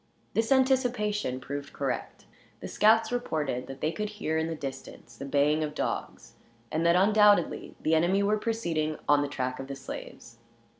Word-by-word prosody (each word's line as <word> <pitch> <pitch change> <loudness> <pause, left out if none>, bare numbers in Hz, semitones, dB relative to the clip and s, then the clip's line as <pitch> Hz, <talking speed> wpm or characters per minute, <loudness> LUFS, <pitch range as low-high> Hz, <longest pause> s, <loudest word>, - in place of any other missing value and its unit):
This 225 +2 0
anticipation 245 - +1
proved 140 +2 -6
correct. 135 -3 -4 0.3
The - - -7
scouts 225 +1 +3
reported 150 - -2
that 135 0 -9
they 155 - +1
could 210 +5 -3
hear, 210 -7 -3
in 160 0 0
the 165 - -3
distance, 135 -3 -8
the 140 - -7
baying 145 +2 +2
of 150 -1 -4
dogs; - - -4 0.4
and 160 +1 0
that, 170 - +5
undoubtedly, 205 -1 +3
the 160 - 0
enemy 175 +5 +3
were 210 +1 +2
proceeding 165 -10 -1
on 145 0 +5
the 145 - -1
track 130 -2 -3
of 135 - -6
the 140 - -5
slaves. 115 -3 -9
160 Hz, 170 wpm, -28 LUFS, 140-210 Hz, 0.4 s, that